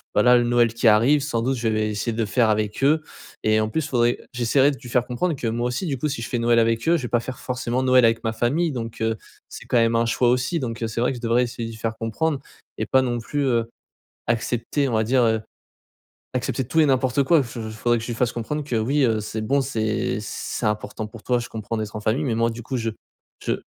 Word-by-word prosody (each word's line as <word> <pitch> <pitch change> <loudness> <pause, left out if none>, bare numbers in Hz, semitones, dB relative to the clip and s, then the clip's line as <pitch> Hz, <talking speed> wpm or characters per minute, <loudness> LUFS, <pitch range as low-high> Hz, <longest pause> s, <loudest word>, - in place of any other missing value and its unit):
voilà 125 0 +6
le 120 - +2
Noël 120 -1 +3
qui 115 0 +1
arrive, 115 +7 +5
sans 135 -5 -1
doute, 130 +3 0
je 115 -1 -1
vais 110 -1 +1
essayer 105 +2 -2
de 110 - -5
le - - +1
faire 115 +2 +2
avec 105 +1 -1
eux, 155 +3 +4 0.4
et 110 0 +3
en 110 - +1
plus 155 +7 -2
faudrait 120 -4 +1
j'essaierai 130 +4 +3
de 140 - -6
lui 125 - -10
faire 120 0 +1
comprendre 155 +7 -1
que 125 - -3
moi 120 +2 -1
aussi 125 +9 -2
du 140 -4 -1
coup, 140 - -1
si 145 -5 -3
je 115 - -5
fais 120 - -1
Noël 115 0 +3
avec 115 +2 +1
eux, 170 - +5
je 165 - -1
vais 120 - -4
pas 120 - +2
faire 130 +2 -6
forcément 125 0 -2
Noël 130 -1 +5
avec 115 0 +2
ma 110 - 0
famille, 140 +9 0
donc, 115 -4 -6
heu, 110 -1 0 0.3
c'est - - -10
quand - - -2
même 115 0 +3
un 115 - +2
choix 120 +1 +2
aussi. 125 +7 +1
Donc, 115 -3 -4
heu, 115 - 0
c'est 110 +1 -3
vrai 125 - +2
que 130 - -5
je - - -10
devrais 120 +1 +2
essayer 120 -1 -4
de 115 - -6
lui - - -10
faire 110 0 -3
comprendre 135 +7 -1 0.4
et - - -1
pas 130 - +3
non 120 -2 -1
plus, 145 +5 -2
heu, 115 -3 +1 0.6
accepter 120 +4 0
on 120 - -2
va 110 0 +2
dire, 125 +3 +3
heu, 110 -1 +2 0.9
accepter 130 +1 -1
tout 160 - 0
et 155 - +5
n'importe 130 0 +2
quoi. 160 +1 +4
Je 120 -1 -7
j - - -8
faudrait 120 +1 +1
que 115 - -6
je - - -8
lui 120 - -2
fasse 120 +1 +1
comprendre 135 +6 -3
que, 125 -5 -2
oui, 135 +7 +1
heu, 110 -3 +2
c'est 110 +1 -4
bon, 140 +6 +2
c'est 110 +1 -1
c'est 110 +2 -4
important 105 +1 -2
pour 110 0 -12
toi, 125 -1 +1
je 120 - -7
comprends, 110 +1 -5
d'être 110 -1 -4
en - - -4
famille, 110 +8 0
mais 125 -5 0
moi 115 0 +2
du 120 +1 -7
coup 130 +3 -3
je 115 -2 -1 0.5
je - - +1
120 Hz, 275 wpm, -23 LUFS, 115-130 Hz, 0.9 s, voilà